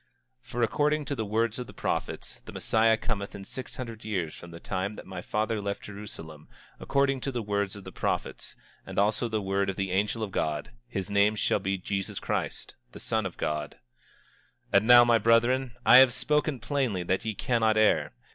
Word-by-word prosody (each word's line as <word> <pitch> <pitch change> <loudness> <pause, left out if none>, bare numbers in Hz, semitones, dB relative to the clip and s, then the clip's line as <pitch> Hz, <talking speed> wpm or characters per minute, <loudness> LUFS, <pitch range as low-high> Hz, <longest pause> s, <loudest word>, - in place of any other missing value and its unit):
25:19 - - -28
For 120 - -3
according 150 +5 +1
to 140 - -2
the 110 -4 -2
words 115 +3 0
of 125 - -5
the - - -11
prophets, - - -3
the - - -8
Messiah 110 0 +2
cometh 105 -4 -3
in 100 -1 -8
six 130 - -7
hundred 115 -3 -7
years 90 -7 -2
from 85 - -11
the 85 0 -10
time 95 +3 -3
that - - -10
my 95 -1 -7
father 110 +2 -1
left 100 0 -4
Jerusalem; 90 -7 -9
and - - -24
according 140 -1 +1
to 135 - -2
the 120 -3 -3
words 100 -1 -1
of 100 - -10
the - - -9
prophets, - - -3 0.3
and - - -9
also 110 +4 +2
the 110 -2 -1
word 95 0 0
of 95 - -2
the 95 -1 -2
angel 105 +4 0
of 105 - -4
God, 75 +1 -2 0.2
his 95 -3 -4
name 100 +1 +4
shall 105 - +1
be 95 0 -1
Jesus 95 +1 -3
Christ, - - -3 0.2
the - - -9
Son 110 -3 0
of 90 - -11
God. 75 -1 -3 1.0
25:20 - - +7
And 110 - -5
now, 120 0 +10
my 120 -1 +4
brethren, 120 +3 +3
I 125 - +9
have 130 -2 +8
spoken 150 -1 0
plainly 120 -8 -1
that 95 +2 0
ye 110 -2 -3
cannot 110 -1 +1
err. 110 -1 +3
110 Hz, 210 wpm, -28 LUFS, 95-120 Hz, 1.0 s, now